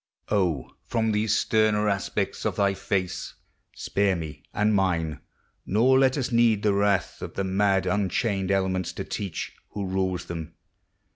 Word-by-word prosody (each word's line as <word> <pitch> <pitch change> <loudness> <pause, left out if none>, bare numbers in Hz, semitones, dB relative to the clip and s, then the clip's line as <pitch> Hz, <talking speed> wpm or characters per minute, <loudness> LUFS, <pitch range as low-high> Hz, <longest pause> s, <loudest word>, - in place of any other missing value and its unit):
O, 90 -10 0 0.2
from 110 -1 +1
these 105 0 +2
sterner 110 -1 +2
aspects 100 -2 -1
of - - -1
thy 100 -1 +2
face 95 -1 -2 0.4
Spare 100 -1 +1
me 80 -3 -6
and 105 +1 +2
mine, 85 -6 +1 0.4
nor 125 +7 +4
let 130 +1 +3
us 135 -1 -1
need 115 -3 +3
the 105 -2 +3
wrath 100 -1 +1
Of - - -7
the 100 - -1
mad 95 0 +2
unchained 95 +1 0
elements 95 -2 0
to - - -4
teach 100 -6 -4 0.2
Who 100 -1 -3
rules 95 -1 -1
them. 80 -1 -6
100 Hz, 150 wpm, -26 LUFS, 95-105 Hz, 0.4 s, nor